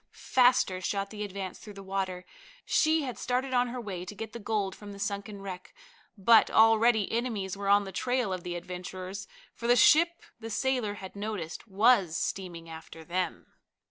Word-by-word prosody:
Faster 245 -7 +3
shot 200 +2 -2
the 210 -1 -5
Advance 195 -2 -6
through 210 -2 -11
the 195 - -9
water. 190 -2 -3 0.4
She 315 0 +3
had 255 -3 -5
started 255 +1 -1
on 245 0 +3
her 250 +1 -5
way 195 -6 -5
to 195 +3 -8
get 220 +1 -7
the 235 - -6
gold 205 -3 -1
from 205 -1 -10
the - - -10
sunken 200 0 -4
wreck, 185 -2 -8 0.4
but 220 +3 +6
already 225 -1 +4
enemies 225 -5 -2
were 200 0 -3
on 205 0 +5
the 195 - -7
trail 245 0 0
of 185 - -4
the 175 -1 -4
adventurers, 185 +2 -6 0.3
for 235 - -5
the 240 - +6
ship 335 +7 +5 0.2
the 225 0 -7
sailor 240 -2 0
had 190 -1 -9
noticed 200 -3 -5
was 200 -4 +3
steaming 175 -3 -4
after 160 0 -10
them. 175 +1 -3
200 Hz, 180 wpm, -29 LUFS, 185-235 Hz, 0.4 s, but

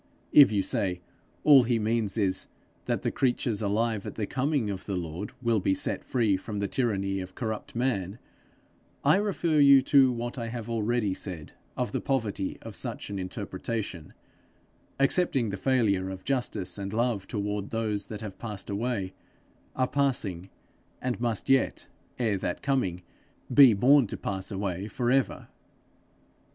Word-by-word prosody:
If 145 -5 +9
you 100 -2 +1
say 90 -3 -1 0.4
all 145 -3 +8
he 120 -1 +1
means 110 -1 0
is, 95 -4 +1 0.4
that - - -1
the - - 0
creatures 120 -4 0
alive 110 0 0
at - - -6
the 110 - -2
coming 130 -3 0
of 95 -1 -7
the 100 - -2
Lord 85 +3 -5
will 115 -2 +2
be 95 0 +1
set - - -2
free 110 -6 +1
from 105 +2 -6
the 100 0 -1
tyranny 100 -5 0
of 95 0 -8
corrupt 110 -2 -4
man, 115 -6 -1 0.9
I - - +6
refer 180 -6 +1
you 140 -2 +7
to 135 -3 +5
what 120 +1 -4
I 115 - -3
have 115 -1 -5
already 115 -2 0
said 90 -5 -7 0.2
of - - -1
the - - -2
poverty 110 -8 -2
of - - -8
such - - -4
an 100 - -3
interpretation, 95 -2 -5 0.8
accepting 135 - +2
the - - -3
failure 100 -6 +1
of 95 -1 -7
justice 120 -8 -1
and 100 0 -4
love 115 -3 0
toward 105 -1 -3
those 110 -3 -2
that 105 -2 -7
have 105 -3 -8
passed 105 -3 -6
away, 100 -3 -2 0.6
are 130 0 +1
passing, 110 -11 -1 0.5
and 125 -2 -3
must 115 -4 -1
yet, 135 0 +2 0.3
ere 110 -5 0
that 90 - -3
coming, 95 -11 0 0.5
be 135 -6 +8
born 130 +4 +5
to - - -5
pass 95 -1 -4
away 95 -1 -3
for 120 +3 -1
ever. 135 0 0
110 Hz, 160 wpm, -28 LUFS, 100-125 Hz, 0.9 s, If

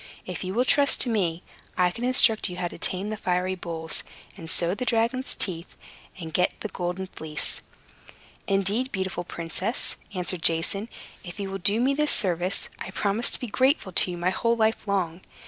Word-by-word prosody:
If 180 0 -5
you 185 +2 -4
will 250 +2 +3
trust 280 +1 +4
to 250 - +4
me, 180 -5 0 0.3
I 180 -1 +4
can 230 +6 -7
instruct 235 -5 +4
you 180 - -7
how 175 -1 -1
to - - -10
tame 190 +3 -1
the 215 - -3
fiery 180 0 0
bulls, 165 -3 -4 0.3
and 165 -4 -9
sow 170 +1 +2
the 250 - -3
dragon's 240 +2 +1
teeth, 170 -3 -5 0.4
and 160 -2 -7
get 180 - +1
the 215 - -3
Golden 180 +1 -3
Fleece." 155 -4 -4 0.9
"Indeed, 200 +6 +1
beautiful 190 -2 -2
princess," 175 +7 -2 0.2
answered 180 -1 0
Jason, 170 +7 +2 0.3
"if 175 +1 -8
you 195 -1 -3
will 195 - -4
do 200 +4 +3
me 260 +3 +3
this 300 +1 +1
service, 180 -1 +1
I - - -5
promise 200 +4 0
to - - +2
be - - -4
grateful 255 -2 +2
to 180 - +4
you 175 - -4
my 175 +2 +1
whole 230 +4 +1
life 220 -1 +1
long." 185 -3 -1
190 Hz, 190 wpm, -26 LUFS, 175-225 Hz, 0.9 s, trust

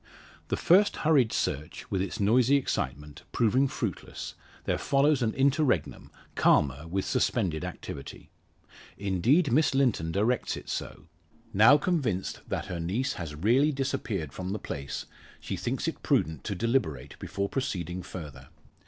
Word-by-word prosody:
The - - -1
first 195 +4 +4
hurried 140 -8 +4
search, 75 +4 -3
with 95 -2 0
its 95 -2 -4
noisy 120 +6 +4
excitement, 75 - -2
proving 125 +4 +3
fruitless, - - -5 0.3
there - - -1
follows 140 0 +3
an 115 -2 +2
interregnum 135 - +1 0.2
calmer 75 +2 +2
with 95 +3 -2
suspended 80 -3 0
activity. 90 -5 -8 0.7
Indeed, 115 - +2
Miss 145 +2 +3
Linton 120 -12 +2
directs 110 +7 0
it - - -10
so. - - -5 0.5
Now 110 +9 +7
convinced 140 - -1
that - - -2
her 85 - -5
niece 110 +11 -1
has 75 -3 -5
really 120 - +3
disappeared 115 - -3
from 95 +1 -4
the - - -2
place, 70 -8 -5 0.3
she - - -4
thinks - - -2
it - - -3
prudent 80 -4 +1
to 100 - -2
deliberate 110 - -1
before 100 0 -3
proceeding 90 - -3
further. 75 -8 -9
100 Hz, 140 wpm, -28 LUFS, 85-135 Hz, 0.7 s, Now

